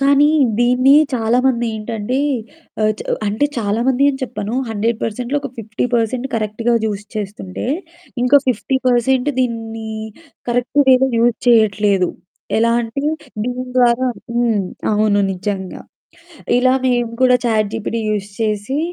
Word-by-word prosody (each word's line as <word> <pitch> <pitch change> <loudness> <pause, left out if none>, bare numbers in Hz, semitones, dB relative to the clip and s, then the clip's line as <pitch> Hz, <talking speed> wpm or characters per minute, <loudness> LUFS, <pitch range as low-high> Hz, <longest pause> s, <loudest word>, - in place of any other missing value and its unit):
కానీ 280 +1 +4 0.3
దీన్ని 250 +3 +4 0.2
చాలామంది 240 +1 +1
ఏంటంటే 220 +3 -3 0.6
ఆహ్, 215 0 +3
చ - - -10 0.3
అంటే 215 +8 +1
చాలామంది 235 +5 +1
అని 265 - -6
చెప్పను 215 -2 -4
100%లో 230 +4 -2
ఒక 275 - -5
50% 230 +3 -1
కరెక్ట్‌గా 225 +2 0
యూజ్ 205 -1 -4
చేస్తుంటే 195 -2 -5 0.6
ఇంక 250 +3 +3
50% 255 +1 +1
దీన్ని 225 -2 -3 0.6
కరెక్ట్ 245 +4 +1
వేలో 260 0 +5
యూజ్ 235 0 +3
చేయట్లేదు. 205 -5 +3 0.5
ఎలా 230 +1 +3
అంటే, 230 +3 -4 0.4
దీని 250 +1 -3
ద్వారా 250 0 +3 0.3
హ్మ్. 235 -3 +2 0.3
అవును 210 -1 +2
నిజంగా. 190 0 -4 0.8
ఇలా 255 +1 +3
మేము 240 -2 0
కూడా 255 -1 +5
చాట్‌జీపీటీ 220 0 -1
యూజ్ 205 -1 -2
చేసి 215 +5 -1
230 Hz, 115 wpm, -18 LUFS, 215-250 Hz, 0.8 s, వేలో